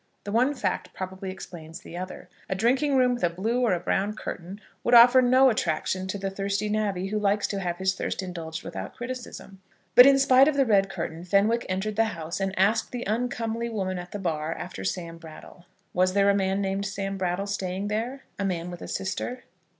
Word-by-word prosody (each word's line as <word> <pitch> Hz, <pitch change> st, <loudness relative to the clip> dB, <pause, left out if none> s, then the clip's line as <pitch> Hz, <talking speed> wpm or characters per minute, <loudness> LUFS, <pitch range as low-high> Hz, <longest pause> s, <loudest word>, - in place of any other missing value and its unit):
The 205 Hz, -, -5 dB
one 250 Hz, +6 st, +2 dB
fact 180 Hz, -7 st, -3 dB
probably 190 Hz, 0 st, -5 dB
explains 165 Hz, -4 st, -9 dB
the -, -, -11 dB
other. 185 Hz, +1 st, -7 dB, 0.2 s
A 190 Hz, -, 0 dB
drinking 260 Hz, +8 st, +2 dB
room 250 Hz, -1 st, +4 dB
with 240 Hz, -, -5 dB
a 175 Hz, -, +4 dB
blue 220 Hz, +9 st, -1 dB
or 235 Hz, -6 st, +3 dB
a 175 Hz, -, 0 dB
brown 195 Hz, +4 st, -1 dB
curtain 185 Hz, 0 st, -7 dB, 0.2 s
would 240 Hz, -, +4 dB
offer 245 Hz, +2 st, +9 dB
no 255 Hz, +1 st, +5 dB
attraction 185 Hz, -1 st, -1 dB
to 190 Hz, -, -3 dB
the 195 Hz, 0 st, -3 dB
thirsty 200 Hz, +2 st, -2 dB
navvy 200 Hz, -3 st, -1 dB
who 215 Hz, +1 st, -1 dB
likes 205 Hz, 0 st, +1 dB
to 200 Hz, -, -2 dB
have 175 Hz, -2 st, -2 dB
his 190 Hz, +1 st, +1 dB
thirst 190 Hz, -, -3 dB
indulged 165 Hz, -3 st, -6 dB
without 165 Hz, -, -7 dB
criticism. 240 Hz, -6 st, -7 dB, 0.3 s
But, 250 Hz, +5 st, +10 dB
in 275 Hz, 0 st, +6 dB
spite 270 Hz, 0 st, +6 dB
of 310 Hz, -, +2 dB
the 275 Hz, -1 st, +3 dB
red 195 Hz, -4 st, +3 dB
curtain, 165 Hz, -3 st, -5 dB
Fenwick 205 Hz, +6 st, +2 dB
entered 200 Hz, +3 st, -2 dB
the 225 Hz, -, +4 dB
house, 160 Hz, +2 st, -5 dB
and 195 Hz, 0 st, -2 dB
asked 210 Hz, +4 st, +2 dB
the 245 Hz, -1 st, -4 dB
uncomely 230 Hz, +1 st, -2 dB
woman 190 Hz, -4 st, -2 dB
at 175 Hz, 0 st, -9 dB
the -, -, -4 dB
bar 165 Hz, -4 st, -2 dB
after 180 Hz, +1 st, -7 dB
Sam 170 Hz, -3 st, -4 dB
Brattle. 165 Hz, +2 st, -13 dB, 0.3 s
Was 185 Hz, +1 st, +2 dB
there 200 Hz, 0 st, +4 dB
a -, -, +1 dB
man 195 Hz, 0 st, 0 dB
named 195 Hz, 0 st, -1 dB
Sam 195 Hz, 0 st, -3 dB
Brattle 185 Hz, +1 st, -1 dB
staying 195 Hz, -1 st, -3 dB
there; 235 Hz, +6 st, -3 dB, 0.2 s
a -, -, 0 dB
man 180 Hz, -2 st, -2 dB
with 175 Hz, -, -9 dB
a -, -, -7 dB
sister? 245 Hz, +6 st, -4 dB
195 Hz, 210 wpm, -26 LUFS, 185-230 Hz, 0.3 s, But